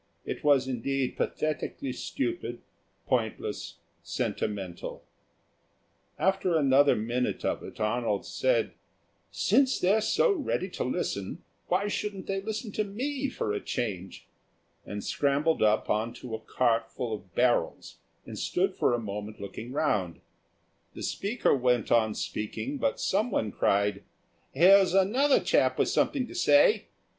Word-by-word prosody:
It - - -5
was 140 -3 +4
indeed 130 +1 -1
pathetically 150 -3 -2
stupid, 120 -2 -4 0.4
pointless, - - -2 0.3
sentimental. 95 -4 -4 1.1
After 190 -3 +2
another 140 -1 +5
minute 120 +3 -2
of - - -1
it, - - -10
Arnold 110 -1 0
said, - - 0 0.6
"Since 270 -2 +2
they're 200 +4 +3
so 470 - +3
ready 280 - -1
to - - -3
listen, 100 -6 -3 0.2
why 190 +3 +1
shouldn't 205 -2 -3
they 195 0 -2
listen 220 +2 -4
to 215 - 0
me 260 +7 -3
for 105 - -2
a 105 - -1
change?" 95 -6 -4 0.6
and 105 0 -5
scrambled 145 +3 +1
up 110 0 +3
on 110 +2 -1
to 125 -3 -8
a 110 - -3
cart 115 0 0
full 120 -3 -4
of 95 -4 -9
barrels 125 -1 +1 0.3
and - - -7
stood - - 0
for 120 - +2
a - - -2
moment 105 0 -6
looking 110 +4 -7
round. 105 - 0 0.8
The - - -7
speaker 210 - +1
went 125 -3 +1
on 110 -2 +3
speaking, 265 - -4
but 280 - 0
someone 195 - 0
cried, 100 0 +1 0.5
"Here's 190 +1 +6
another 250 +9 +4
chap - - +2
with - - +2
something 270 -4 +1
to - - -11
say. 350 +1 +4
135 Hz, 135 wpm, -28 LUFS, -, 1.1 s, Here's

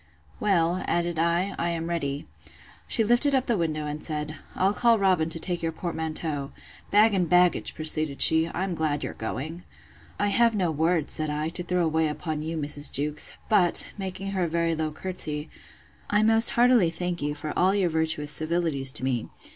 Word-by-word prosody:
Well, 180 -3 +1
added 170 -1 -1
I, 170 +4 +1
I 170 - 0
am 165 -1 -3
ready. 145 -4 -3 0.6
She 225 - +3
lifted 240 +6 +2
up 260 -1 +1
the 235 - +1
window, 155 -4 -2
and 150 +1 -5
said, 150 0 -4 0.2
I'll 195 +2 +2
call 235 +1 +3
Robin 185 -5 +2
to 165 - -3
take 175 0 -3
your 165 -1 -1
portmanteau: 160 -4 -4 0.4
Bag 210 +1 +4
and 180 -4 0
baggage! 180 0 +3
proceeded 155 -2 0
she, 160 +1 +5
I'm 185 +1 -3
glad 155 -3 -2
you're - - -4
going. 145 +10 -6 0.6
I 205 - +1
have 230 +2 +3
no 180 -5 0
words, 160 +1 +2
said 155 -1 +3
I, 150 +1 -2
to 175 - -2
throw 175 0 0
away 160 0 +1
upon 150 +1 -4
you, 160 +1 -4
Mrs. 145 -1 -2
Jewkes; 150 +2 0
but, 180 -6 +3
making 195 0 -5
her 185 -3 -1
a - - -2
very 165 0 0
low 160 -1 -2
courtesy, 155 -3 -5 0.6
I 210 +1 +2
most 225 +1 +6
heartily 240 -7 +5
thank 175 0 -4
you 145 0 -2
for 150 +1 -5
all 190 +2 +2
your 190 -4 +1
virtuous 160 -2 -1
civilities 155 -4 0
to - - -3
me. 125 -4 -2
165 Hz, 185 wpm, -26 LUFS, 155-185 Hz, 0.6 s, most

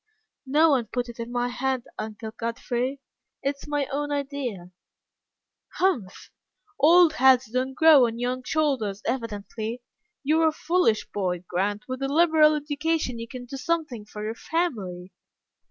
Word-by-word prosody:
"No 310 +4 +4
one 250 -5 +1
put 245 -1 -3
it 235 - -10
into 230 +1 -5
my 245 0 0
head, 255 0 -1 0.2
Uncle 220 0 -6
Godfrey. 240 +4 -3 0.4
It's 275 +1 -3
my 290 -1 0
own 290 +1 -2
idea." 270 -11 -4 1.0
"Humph! 295 - -1 0.5
old 335 +1 +6
heads 260 -4 +4
don't 255 +2 -1
grow 305 -5 +7
on 230 0 -5
young 250 +1 -2
shoulders, 250 -10 -1
evidently. 230 0 -4 0.4
You 310 +3 +2
are 325 - +5
a - - +3
foolish 325 -10 +1
boy, 180 -3 -2
Grant. 205 +4 -2
With 255 +1 -5
a 270 0 -1
liberal 310 -1 +5
education 295 -3 -1
you 230 - -6
can 250 +1 -8
do 270 +3 -7
something 295 -8 -2
for 210 0 -8
your 215 +1 -2
family." 210 - -3
255 Hz, 150 wpm, -25 LUFS, 225-295 Hz, 1.0 s, grow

